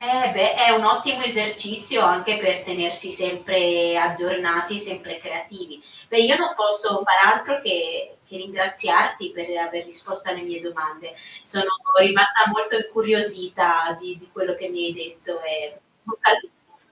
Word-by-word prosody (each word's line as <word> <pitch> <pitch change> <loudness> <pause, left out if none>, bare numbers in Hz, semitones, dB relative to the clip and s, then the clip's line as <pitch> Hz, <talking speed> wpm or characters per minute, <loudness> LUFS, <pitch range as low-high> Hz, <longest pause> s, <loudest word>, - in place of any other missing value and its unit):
Eh, 250 +1 +1
beh, 190 - +3
è 235 -1 +6
un 225 -1 +2
ottimo 255 +4 +2
esercizio 215 -3 -1
anche 180 +4 +3
per 185 -3 0
tenersi 175 0 -4
sempre 180 -2 0
aggiornati, 175 +2 -1
sempre 190 -4 -8
creativi. 165 -2 -11 0.3
Beh, 230 - 0
io 250 +5 +5
non 340 +1 -1
posso 205 -1 +1
far 195 +1 +7
altro 280 +6 -1
che - - -2 0.2
che 190 - -13
ringraziarti 190 - 0
per 170 0 -9
aver 170 0 -5
risposto 190 +3 -9
alle 180 -1 -6
mie 175 -1 -8
domande. 165 -1 -8 0.3
Sono 195 -1 -2 0.3
rimasta 200 +3 +6
molto 215 +1 -1
incuriosita 195 -7 0
di 180 0 -11
di 180 - -23
quello 185 -1 -4
che 185 - -8
mi 175 -1 -4
hai 170 - -4
detto 165 0 -10
e 155 -1 -5
in - - -21 0.2
bocca 220 -1 +2
al 215 - +5
lupo. 405 +4 -24
190 Hz, 155 wpm, -21 LUFS, 175-215 Hz, 0.3 s, far